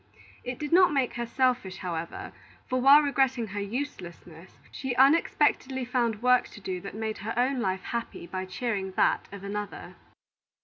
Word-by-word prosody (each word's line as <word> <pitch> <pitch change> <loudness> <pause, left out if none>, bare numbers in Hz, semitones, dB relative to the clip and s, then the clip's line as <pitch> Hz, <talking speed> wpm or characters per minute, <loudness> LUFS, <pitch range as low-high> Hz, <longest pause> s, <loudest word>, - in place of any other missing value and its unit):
It 250 0 -5
did 295 -1 -5
not 365 -1 +6
make 270 -4 0
her 240 0 -4
selfish, 250 -7 0
however, 170 -3 -5 0.3
for 255 0 -1
while 280 +3 +8
regretting 265 -4 +1
her 205 +1 -4
uselessness, 190 - -6 0.2
she 265 -2 -4
unexpectedly 265 -2 +3
found 235 -3 -1
work 250 0 +4
to - - -13
do 185 -2 -4
that 195 +1 -8
made 220 0 -4
her 215 +3 -4
own 255 +2 +1
life 190 -4 -1
happy 235 -6 -5
by 185 +2 -5
cheering 190 0 -3
that - - +2
of 200 -1 -9
another. 205 +1 -6
235 Hz, 165 wpm, -27 LUFS, 190-260 Hz, 0.3 s, while